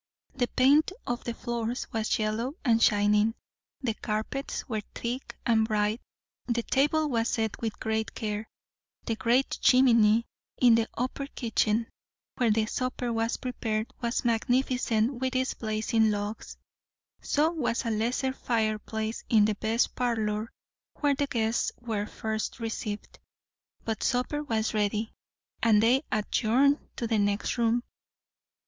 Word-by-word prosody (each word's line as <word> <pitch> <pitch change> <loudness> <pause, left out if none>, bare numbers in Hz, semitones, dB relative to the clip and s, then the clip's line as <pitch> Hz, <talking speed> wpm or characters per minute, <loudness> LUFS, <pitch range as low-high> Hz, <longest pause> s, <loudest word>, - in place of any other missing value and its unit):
The 250 -2 0
paint 285 +8 +4
of 240 0 -3
the 235 - -3
floors 235 +1 -3
was 220 -1 0
yellow 220 +5 -1
and 230 -2 +4
shining; 210 +2 +4 0.5
the 240 -5 0
carpets 220 +6 -3
were 220 -5 -2
thick 240 +1 -4
and 220 -2 +3
bright; 215 +1 0 0.5
the 235 -1 0
table 295 +5 +2
was 230 -4 0
set 220 -2 -2
with 225 -2 -3
great 220 -1 -2
care; 210 0 -3 0.6
the 225 - -1
great 240 +4 +1
chimney 230 -3 +5 0.3
in 245 -2 +6
the 225 0 +2
upper 260 +3 -2
kitchen 225 -3 0 0.5
where 245 -3 +2
the 215 0 +2
supper 250 +1 -2
was 225 +1 0
prepared, 225 -3 -3
was 235 +1 -1
magnificent 245 0 +1
with 260 0 -1
its 260 0 +1
blazing 220 0 +1
logs. 205 +1 -4 0.6
So 305 +3 +2
was 265 -7 -1
a 230 - 0
lesser 240 +4 0
fireplace 220 -2 -2
in 215 -3 +5
the 215 - +1
best 225 +3 0
parlour, 220 -3 -1 0.4
where 290 -2 +2
the 280 +1 -1
guests 230 -4 0
were 220 -4 -3
first 220 +1 -4
received; 220 -2 -5 0.7
but 225 -2 -2
supper 250 +4 0
was 225 -6 -1
ready, 210 +1 0 0.5
and 220 -2 +5
they 250 +4 +4
adjourned 240 +6 +2 0.2
to 240 - -3
the 225 -2 +1
next 205 +4 0
room. 235 +1 +2
230 Hz, 140 wpm, -28 LUFS, 215-250 Hz, 0.7 s, in